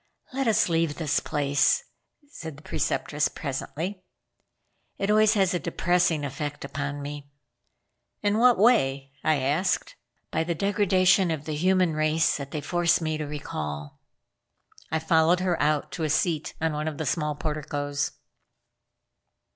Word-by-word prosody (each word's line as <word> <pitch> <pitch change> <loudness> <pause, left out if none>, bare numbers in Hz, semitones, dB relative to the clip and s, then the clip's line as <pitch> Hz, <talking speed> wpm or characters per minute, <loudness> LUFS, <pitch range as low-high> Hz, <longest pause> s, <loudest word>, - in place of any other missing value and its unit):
"Let 270 -1 -1
us 220 - +3
leave 165 -3 +1
this 155 -3 0
place," 145 -1 +1 0.4
said 160 - -8
the 150 - -15
Preceptress 150 0 0
presently. 165 +7 -5 0.9
"It 195 +1 0
always 215 +1 +5
has 190 -3 +2
a 175 - 0
depressing 170 -1 +1
effect 145 +1 -5
upon 145 +1 -4
me." 145 0 -7 0.9
"In 205 +1 +2
what 245 0 +6
way?" 135 - +3
I 155 - +3
asked. 145 +7 0 0.4
"By - - +1
the 170 +1 -2
degradation 195 -1 +3
of 155 -2 -3
the 155 - -3
human 180 +2 +2
race 155 +1 +2
that 140 -2 -6
they 150 +1 -4
force 175 +2 +2
me 155 -2 -2
to 150 - -3
recall." 75 - -5 0.9
I 160 - 0
followed 160 +2 +3
her 180 -2 0
out 150 0 +1
to 150 +4 -4
a 155 - 0
seat 155 0 0
on 160 -1 0
one 150 +1 -2
of 155 -2 -3
the 160 - -3
small 150 +1 -1
porticoes. 145 -2 -3
155 Hz, 145 wpm, -26 LUFS, 145-180 Hz, 0.9 s, what